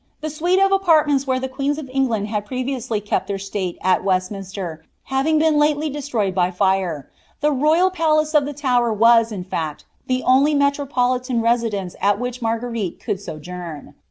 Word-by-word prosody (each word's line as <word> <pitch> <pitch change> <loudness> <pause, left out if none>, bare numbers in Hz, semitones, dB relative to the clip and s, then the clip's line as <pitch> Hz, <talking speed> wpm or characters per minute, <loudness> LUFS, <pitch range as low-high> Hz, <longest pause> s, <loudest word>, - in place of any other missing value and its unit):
The 310 0 -3
suite 345 +5 +1
of 390 0 +4
apartments 310 -8 +3
where 260 -1 +1
the 265 - -3
queens 275 +2 -2
of 305 -3 -6
England 235 -6 0
had 210 -1 -3
previously 255 -3 -2
kept 205 -2 -2
their 200 -1 -2
state 195 -2 -4
at 185 0 +2
Westminster 185 -3 -3 0.3
liaTing 275 +4 +2
been 310 -1 +3
lately 300 0 +1
d/estroyed 250 -9 -2
by 180 -1 +1
Are, 190 -7 +1 0.3
the 300 0 +3
royal 310 +7 +3
palace 310 -3 +1
of 295 -2 +4
the 290 - -4
Tower 250 -4 +1
was, 230 +1 +4
in 185 -4 -5
(act, 155 -2 -3 0.2
the 255 0 0
only 275 +4 +4
metropolitan 255 -3 +1
residence 225 -5 0
at 200 0 +3
which 245 0 -4
Marguerite 230 -4 -2
could - - -2
so^ 165 -5 -8
jouni.' 170 -2 -8
245 Hz, 175 wpm, -21 LUFS, 200-290 Hz, 0.3 s, of